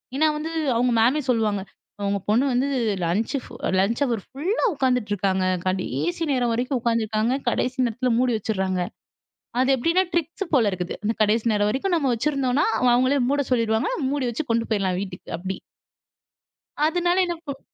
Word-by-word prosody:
ஏன்னா 310 +3 +3
வந்து 315 +2 -4 0.3
அவுங்க 245 +1 +2
மேமே 265 +7 +3
சொல்லுவாங்க. 215 -4 +1 0.5
"உங்க 200 0 0
பொண்ணு 240 +6 +3
வந்து 260 +3 +1 0.4
லஞ்ச் 210 - 0
ஃபு - - -13 0.3
லஞ்ச் 225 +7 +1
ஹவர் 230 -6 -2
ஃபுல்லா 345 - -1
உட்காந்துட்டு 250 -6 +1
இருக்காங்க. 190 -1 0 0.2
கடைசி 175 - -1
நேரம் 245 -2 +1
வரைக்கும் 250 +2 -1
உக்காந்துருக்காங்க. 230 +1 +1
கடைசி 255 +2 -1
நேரத்தில 245 +2 -1
மூடி 250 -2 +2
வச்சிர்றாங்க." 190 -3 -1 0.8
அது 260 - +2
எப்பிடின்னா 335 +9 +2
ட்ரிக்ஸு 340 +4 -1
போல 225 -6 +4
இருக்குது. 180 -1 -4
அந்த 220 +2 +1
கடைசி 215 +2 +1
நேரம் 205 0 +2
வரைக்கும் 350 +7 0
நம்ம 275 -4 0
வச்சிருந்தோன்னா, 275 +2 +1 0.3
அவுங்களே 260 +3 +3
மூட 285 0 +1
சொல்லிடுவாங்க. 230 - +1 0.2
மூடி 285 -3 -1
வச்சு 280 +6 -3
கொண்டு 230 0 +1
போயிட்லாம் 190 -3 +1
வீட்டுக்கு 185 -4 -7
அப்பிடி. 190 +2 -5 1.3
அதனால 350 +2 +1
என்ன 345 -1 -2
ப் 280 - -5
240 Hz, 155 wpm, -24 LUFS, 205-275 Hz, 1.3 s, போல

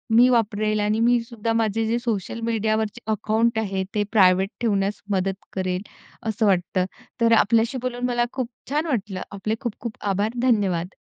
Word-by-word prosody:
मी 245 +2 +7
वापरेल 215 -3 +1
आणि 210 +1 +1
मी 240 +1 +4
सुद्धा 230 -1 -3
माझे 225 0 +1
जे 235 +2 +1
सोशल 230 -2 -3
मीडियावरचे 220 -1 0
अकाउंट 220 +2 +1
आहे 195 -3 -1
ते 210 - +2
प्रायव्हेट 190 -2 +5
ठेवण्यास 200 -3 0
मदत 195 0 -1
करेल 185 -1 -1 0.5
असं 220 0 0
वाटतं. 185 0 +1 0.4
तर 230 0 +5
आपल्याशी 230 +3 +2
बोलून 245 -1 -2
मला 240 -1 +1
खूप 255 -3 -2 0.2
छान 305 +3 +1
वाटलं. 205 -8 -2
आपले 210 +2 -2
खूप 235 -4 -4
खूप 235 -2 -5 0.2
आभार. 205 +3 0
धन्यवाद. 195 -8 +1
215 Hz, 160 wpm, -23 LUFS, 195-230 Hz, 0.5 s, मी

